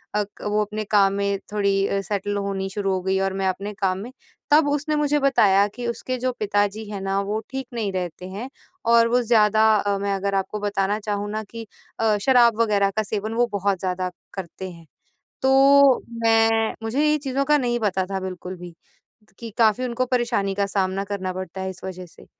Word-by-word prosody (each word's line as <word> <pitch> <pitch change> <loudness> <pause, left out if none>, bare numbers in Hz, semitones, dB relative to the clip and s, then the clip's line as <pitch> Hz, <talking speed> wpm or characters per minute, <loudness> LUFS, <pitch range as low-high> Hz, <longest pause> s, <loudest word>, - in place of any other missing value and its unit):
अक 210 -1 -3
वो 210 +1 +1
अपने 215 +1 -4
काम 200 -2 +3
में 200 0 -1
थोड़ी 200 -1 +1
अ, 195 - -1
सेटल 205 +1 -3
होनी 195 -1 -2
शुरू 195 0 -1
हो 185 - -1
गई 190 +1 0
और 195 0 0
मैं 195 0 -1
अपने 195 +3 -3
काम 190 -2 -1
में, 235 +5 -7 0.4
तब 295 0 +6
उसने 295 +1 -1
मुझे 295 0 +1
बताया 205 -8 +4
कि 245 0 -4
उसके 255 +2 -3
जो 255 +1 0
पिता 205 -1 +2
जी 220 - -6
हैं 200 - -4
ना 195 0 -1
वो 210 +2 -2
ठीक 265 -2 -4
नहीं 220 -4 -2
रहते 180 -1 -4
हैं 215 +8 -6 0.4
और 230 0 +6
वो 245 +1 +3
ज़्यादा 220 -2 +3 0.2
अ, 200 0 0
मैं 200 0 -1
अगर 195 0 -2
आपको 195 +2 -2
बताना 205 0 -1
चाहूँ 205 -1 -3
ना 215 0 -3
कि 225 +1 -9 0.3
अ, 220 -2 +2
शराब 235 -4 +5
वगैरह 200 -3 +2
का 215 - +2
सेवन 215 +1 -3
वो 240 +1 +2
बहुत 200 -1 0
ज़्यादा 185 -1 -2 0.2
करते 190 0 -7
हैं। 170 -1 -14 0.6
तो 275 0 +6 0.2
मैं 225 0 +3
मुझे 240 +7 0
ये 305 - +3
चीज़ों 275 -1 -1
का 300 +1 +4
नहीं 240 -3 0
पता 190 -4 0
था 195 - -1
बिल्कुल 185 0 -6
भी 175 -1 -10 0.6
त - - -29
कि 230 - -7
काफ़ी 230 +1 +3
उनको 250 +1 -1
परेशानी 240 -6 0
का 200 0 +1
सामना 195 0 -1
करना 195 -2 -4
पड़ता 185 0 -6
है 190 - -3
इस 190 0 -10
वजह 185 -1 -6
से। 170 - -18
205 Hz, 210 wpm, -23 LUFS, 195-235 Hz, 0.6 s, तब